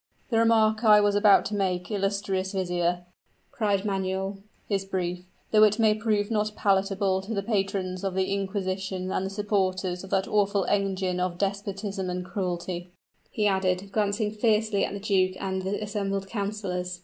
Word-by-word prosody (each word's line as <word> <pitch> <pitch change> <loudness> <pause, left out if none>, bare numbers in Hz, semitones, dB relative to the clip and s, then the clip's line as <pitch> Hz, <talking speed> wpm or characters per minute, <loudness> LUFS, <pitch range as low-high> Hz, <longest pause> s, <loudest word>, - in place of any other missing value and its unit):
"The 225 - +3
remark 220 -1 +3
I 210 -2 +7
was 205 0 +3
about 205 0 +5
to 210 - -3
make, 185 -2 -1
illustrious 195 -1 -1
vizier," 175 -2 -1 0.5
cried 205 -3 0
Manuel, 195 0 -2 0.3
"is 195 -2 0
brief, 180 -2 -3 0.3
though 215 - +5
it 210 0 +5
may 220 -2 +4
prove 215 -1 0
not 210 -1 0
palatable 195 -1 +1
to 215 +4 -5
the 200 - -1
patrons 195 -3 -1
of 190 -2 -2
the 190 +1 0
inquisition 190 -1 -2
and 185 - 0
the 190 - -2
supporters 190 -3 -1
of 195 - -9
that 190 0 +1
awful 200 -2 +2
engine 190 -2 0
of 180 -1 -1
despotism 200 0 -3
and 180 0 -3
cruelty," 180 -2 -3 0.4
he 210 - -1
added, 190 -1 +1
glancing 210 0 0
fiercely 215 -1 +1
at - - -2
the 200 - -4
duke 190 -2 +1
and 190 -1 -2
the 190 +2 -2
assembled 200 -2 -2
councilors. 195 -4 -3
195 Hz, 165 wpm, -27 LUFS, 185-205 Hz, 0.5 s, I